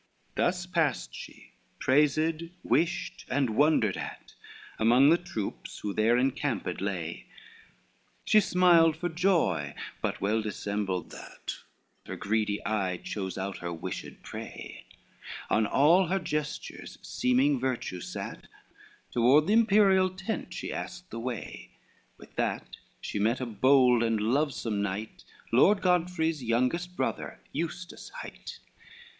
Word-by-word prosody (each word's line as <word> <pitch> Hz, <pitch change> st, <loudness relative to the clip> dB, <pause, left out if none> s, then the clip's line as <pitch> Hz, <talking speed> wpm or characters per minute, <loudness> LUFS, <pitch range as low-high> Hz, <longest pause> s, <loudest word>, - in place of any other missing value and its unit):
XXXIII -, -, -38 dB
Thus 180 Hz, 0 st, 0 dB
passed 165 Hz, -7 st, 0 dB
she, -, -, -11 dB, 0.3 s
praised, 155 Hz, +4 st, +2 dB, 0.2 s
wished, 175 Hz, +1 st, 0 dB
and 130 Hz, -2 st, +1 dB
wondered 140 Hz, -8 st, +3 dB
at, -, -, -7 dB, 0.5 s
Among 125 Hz, +6 st, +6 dB
the 170 Hz, -, +6 dB
troops 115 Hz, -, -5 dB
who 105 Hz, -, -4 dB
there 115 Hz, +4 st, +3 dB
encamped 130 Hz, -7 st, -1 dB
lay, 90 Hz, -4 st, -4 dB, 1.0 s
She 215 Hz, -, +6 dB
smiled 180 Hz, -5 st, +5 dB
for 175 Hz, +2 st, -2 dB
joy, 160 Hz, -, +1 dB, 0.3 s
but -, -, -2 dB
well 110 Hz, +3 st, +1 dB
dissembled 100 Hz, -3 st, -3 dB
that, -, -, -7 dB, 0.5 s
Her -, -, -5 dB
greedy 105 Hz, 0 st, -1 dB
eye 95 Hz, -4 st, 0 dB
chose 95 Hz, 0 st, -5 dB
out 95 Hz, +1 st, -4 dB
her 85 Hz, 0 st, -4 dB
wished 85 Hz, -, -6 dB
prey; -, -, -8 dB, 0.7 s
On 110 Hz, 0 st, +3 dB
all 170 Hz, -, +5 dB
her 190 Hz, +3 st, +1 dB
gestures 150 Hz, -4 st, -4 dB
seeming 130 Hz, +2 st, +2 dB
virtue 120 Hz, -8 st, -2 dB
sat, -, -, -7 dB, 0.6 s
Toward 130 Hz, +6 st, +5 dB
the 205 Hz, -, +2 dB
imperial 200 Hz, -4 st, +5 dB
tent 190 Hz, +4 st, -5 dB
she -, -, -5 dB
asked 180 Hz, 0 st, -7 dB
the 115 Hz, -, -5 dB
way: 120 Hz, -2 st, -6 dB, 0.4 s
With -, -, -16 dB
that -, -, -2 dB, 0.3 s
she -, -, -3 dB
met 115 Hz, +5 st, +2 dB
a 130 Hz, -, -2 dB
bold 125 Hz, +2 st, +4 dB
and 115 Hz, -2 st, +1 dB
lovesome 115 Hz, -2 st, 0 dB
knight, 100 Hz, +2 st, -4 dB, 0.3 s
Lord 195 Hz, -, +5 dB
Godfrey's 165 Hz, -4 st, +1 dB
youngest 130 Hz, +10 st, 0 dB
brother, -, -, -3 dB
Eustace 170 Hz, +3 st, -5 dB
hight. -, -, -9 dB
135 Hz, 125 wpm, -29 LUFS, 110-170 Hz, 1.0 s, Among